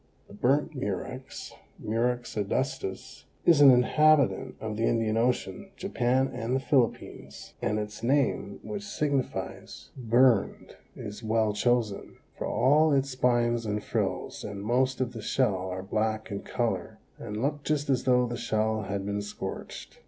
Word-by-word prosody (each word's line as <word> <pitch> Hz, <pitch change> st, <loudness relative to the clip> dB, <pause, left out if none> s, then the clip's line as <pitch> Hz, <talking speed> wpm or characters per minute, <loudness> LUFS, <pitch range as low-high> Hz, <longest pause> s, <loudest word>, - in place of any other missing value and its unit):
The -, -, -14 dB
Burnt 135 Hz, +9 st, +1 dB
Murex 130 Hz, +2 st, -5 dB, 0.2 s
(Murex 120 Hz, +2 st, -1 dB
adustus), 105 Hz, -1 st, -3 dB, 0.2 s
is 165 Hz, -4 st, +6 dB
an 140 Hz, -, +10 dB
inhabitant 145 Hz, +3 st, +4 dB
of 110 Hz, -1 st, -4 dB
the 115 Hz, +2 st, 0 dB
Indian 115 Hz, -2 st, +1 dB
Ocean, 125 Hz, -, -1 dB
Japan 130 Hz, -8 st, +1 dB
and 120 Hz, +1 st, -2 dB
the -, -, +2 dB
Philippines, 130 Hz, -3 st, -1 dB
and 105 Hz, +1 st, 0 dB
its 105 Hz, +1 st, -5 dB
name, 130 Hz, -5 st, 0 dB
which 205 Hz, -1 st, -5 dB
signifies 150 Hz, -10 st, -3 dB
burned, 120 Hz, -2 st, +2 dB, 0.2 s
is 105 Hz, +2 st, -7 dB
well 110 Hz, -1 st, +1 dB
chosen, 115 Hz, -2 st, 0 dB, 0.2 s
for -, -, -4 dB
all 150 Hz, +5 st, +4 dB
its 140 Hz, -1 st, +1 dB
spines 120 Hz, -2 st, +1 dB
and 105 Hz, 0 st, -2 dB
frills -, -, -2 dB
and 100 Hz, -1 st, -6 dB
most 130 Hz, +3 st, +1 dB
of 125 Hz, -, -1 dB
the 115 Hz, -, -7 dB
shell 100 Hz, -5 st, 0 dB
are 95 Hz, 0 st, -5 dB
black 110 Hz, +2 st, -2 dB
in 100 Hz, -, -3 dB
color -, -, -2 dB, 0.2 s
and 105 Hz, +1 st, -5 dB
look 145 Hz, +4 st, -1 dB
just 150 Hz, -1 st, 0 dB
as 135 Hz, -3 st, +1 dB
though 125 Hz, -1 st, +4 dB
the 120 Hz, 0 st, -4 dB
shell 110 Hz, 0 st, 0 dB
had 100 Hz, -1 st, -4 dB
been 100 Hz, 0 st, -2 dB
scorched. 105 Hz, -, -7 dB
120 Hz, 150 wpm, -28 LUFS, 105-135 Hz, 0.2 s, an